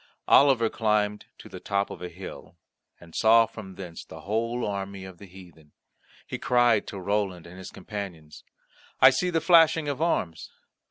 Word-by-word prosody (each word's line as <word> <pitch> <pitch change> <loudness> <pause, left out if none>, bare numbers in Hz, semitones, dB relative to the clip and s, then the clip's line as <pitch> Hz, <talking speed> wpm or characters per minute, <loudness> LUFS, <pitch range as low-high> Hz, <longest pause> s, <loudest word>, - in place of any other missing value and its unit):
Oliver 135 -5 +5
climbed 105 -2 -1
to - - -13
the - - -10
top 100 0 -2
of - - -9
a 90 - -5
hill, 90 +2 -11 0.4
and 85 -1 -16
saw 115 +1 +5
from 100 -4 -11
thence 90 -3 -9
the - - -12
whole 115 +4 -2
army 100 -1 -5
of 95 -2 -12
the 100 - -12
heathen. 90 -5 -16 0.5
He - - -6
cried 120 -3 +2
to 100 - -7
Roland 95 -3 -2
his 90 +2 -10
companion, 95 -8 -8 0.7
"I 130 - +8
see 180 +8 0
the 165 -2 +1
flashing 165 -3 +4
of 145 0 -3
arms. 90 - -1
100 Hz, 165 wpm, -26 LUFS, 95-115 Hz, 0.7 s, I